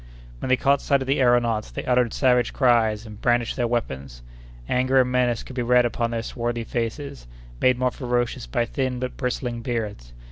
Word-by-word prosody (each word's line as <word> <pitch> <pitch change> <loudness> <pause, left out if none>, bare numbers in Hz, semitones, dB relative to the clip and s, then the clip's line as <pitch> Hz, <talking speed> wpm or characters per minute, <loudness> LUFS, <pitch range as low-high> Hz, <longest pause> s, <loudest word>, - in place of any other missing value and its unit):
When - - -4
they 130 - +4
caught 140 +1 +2
sight 140 -1 +2
of - - -11
the 135 +1 +1
aëronauts, 120 -4 +2
they - - -6
uttered 125 -2 +2
savage 125 -3 +2
cries, 115 -4 +2
and 105 -1 -11
brandished 120 -1 +1
their 120 -2 0
weapons. 65 - -4 0.4
Anger 130 +1 +3
and 125 0 -1
menace 125 -2 +1
could 130 - -11
be 125 - -1
read 125 0 +4
upon 115 0 -1
their 115 -1 -3
swarthy 120 -1 -3
faces, 115 - -4 0.3
made 130 -1 +4
more 125 0 +1
ferocious 120 - -2
by 115 - 0
thin 130 +1 -2
but 125 0 -4
bristling 125 -2 -3
beards. 105 - -4
120 Hz, 190 wpm, -24 LUFS, 115-125 Hz, 0.4 s, they